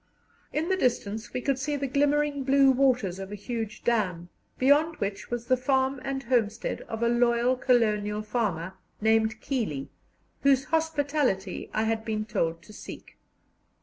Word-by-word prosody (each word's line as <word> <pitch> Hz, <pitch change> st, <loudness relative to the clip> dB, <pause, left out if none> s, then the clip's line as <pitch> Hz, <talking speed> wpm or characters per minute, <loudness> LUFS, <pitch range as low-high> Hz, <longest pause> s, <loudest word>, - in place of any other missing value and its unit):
In 310 Hz, +2 st, -1 dB
the 380 Hz, -, +2 dB
distance 220 Hz, -, -1 dB
we 250 Hz, -, -3 dB
could 275 Hz, 0 st, 0 dB
see 290 Hz, +2 st, -1 dB
the 280 Hz, -1 st, -2 dB
glimmering 285 Hz, +1 st, +1 dB
blue 275 Hz, 0 st, +5 dB
waters 250 Hz, -8 st, +2 dB
of 195 Hz, +1 st, -7 dB
a -, -, -4 dB
huge 220 Hz, +1 st, -5 dB
dam, 185 Hz, -7 st, 0 dB, 0.3 s
beyond 295 Hz, +5 st, +4 dB
which 200 Hz, -4 st, -4 dB
was 240 Hz, -1 st, -3 dB
the 255 Hz, -, +3 dB
farm 265 Hz, +1 st, 0 dB
and 275 Hz, 0 st, -3 dB
homestead 230 Hz, -4 st, 0 dB
of 225 Hz, +1 st, -3 dB
a -, -, +3 dB
loyal 240 Hz, +1 st, +3 dB
colonial 215 Hz, -4 st, +1 dB
farmer 200 Hz, -6 st, -2 dB, 0.3 s
named 220 Hz, 0 st, +2 dB
Keeley, 210 Hz, -, -3 dB, 0.5 s
whose 275 Hz, -1 st, +4 dB
hospitality 290 Hz, -, 0 dB
I 215 Hz, -, 0 dB
had 225 Hz, 0 st, 0 dB
been 215 Hz, -1 st, -2 dB
told 170 Hz, -6 st, -1 dB
to 215 Hz, -, -14 dB
seek. -, -, -11 dB
240 Hz, 155 wpm, -27 LUFS, 215-275 Hz, 0.5 s, blue